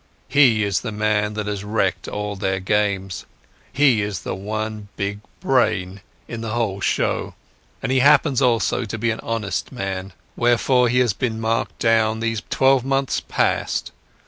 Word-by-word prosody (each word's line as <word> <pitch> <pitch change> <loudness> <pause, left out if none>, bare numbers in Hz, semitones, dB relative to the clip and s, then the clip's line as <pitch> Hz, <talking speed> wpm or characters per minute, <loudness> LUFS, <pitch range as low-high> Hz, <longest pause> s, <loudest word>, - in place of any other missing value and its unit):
"He 125 -6 +4
is 100 -3 0
the 120 - -4
man 105 0 0
that 105 -1 -3
has 105 -1 -3
wrecked 105 -2 -1
all 105 0 -4
their 95 -1 -1
games. 95 -2 -1 0.4
He 135 -6 +4
is 100 -2 -3
the - - -3
one 110 +2 -4
big 100 +1 -2 0.2
brain 100 -7 +1 0.3
in 115 -1 -6
the 110 -1 -4
whole 105 -4 -1
show, - - -1 0.5
and - - -1
he 130 - +3
happens 140 -1 +4
also 120 -3 +2
to 115 +1 -5
be 115 +1 0
an 110 - -4
honest 110 -5 -3
man. 95 -5 -4 0.2
Therefore 120 +1 +3
he 125 - +1
has 120 -5 +2
been 115 0 -2
marked 115 +1 -1
down 110 -1 +2
these 115 -2 -1
twelve 135 -1 +3
months 135 0 0
past. - - -1
110 Hz, 165 wpm, -21 LUFS, 100-120 Hz, 0.5 s, He